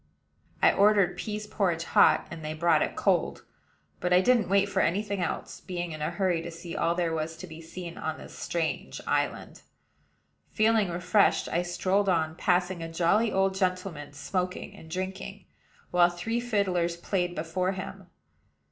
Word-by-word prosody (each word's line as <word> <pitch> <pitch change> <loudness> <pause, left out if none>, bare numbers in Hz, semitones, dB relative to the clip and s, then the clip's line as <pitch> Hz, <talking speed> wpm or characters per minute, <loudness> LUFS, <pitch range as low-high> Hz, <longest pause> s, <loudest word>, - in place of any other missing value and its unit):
I - - +7
ordered 200 -2 +4
pease 210 -1 -4
porridge 180 -6 0
hot, - - +4
and 160 - -7
they 155 0 -4
brought 165 -1 +3
it - - -1
cold; - - +1 0.5
but 180 - -1
I 180 - +7
didn't 230 0 +3
wait 200 0 +4
for 200 - -1
any 190 +6 +2
thing 200 -2 -3
else, 170 - -3
being 175 -2 -4
in 155 -1 -7
a 150 - 0
hurry 185 -4 0
to 170 - -6
see 170 +1 -8
all 170 +1 +1
there 170 -2 0
was 160 0 -3
to - - -8
be 160 -2 -10
seen 170 +1 -8
on 160 0 -3
this - - -11
strange 165 -2 -3
island. - - -1 0.9
Feeling 215 -3 +3
refreshed, 180 +4 +2
I 170 - +1
strolled 190 +3 0
on, 160 -3 +1
passing 180 0 +1
a 165 0 -5
jolly 200 +7 +2
old 195 0 +2
gentleman 185 -6 -2
smoking 180 +4 -3
and 160 - -13
drinking, 190 +2 -5 0.5
while 175 0 +5
three 200 +7 -2
fiddlers 185 -7 0
played 175 0 -1
before 180 +4 -1
him. 190 0 -7
180 Hz, 170 wpm, -28 LUFS, 170-195 Hz, 0.9 s, I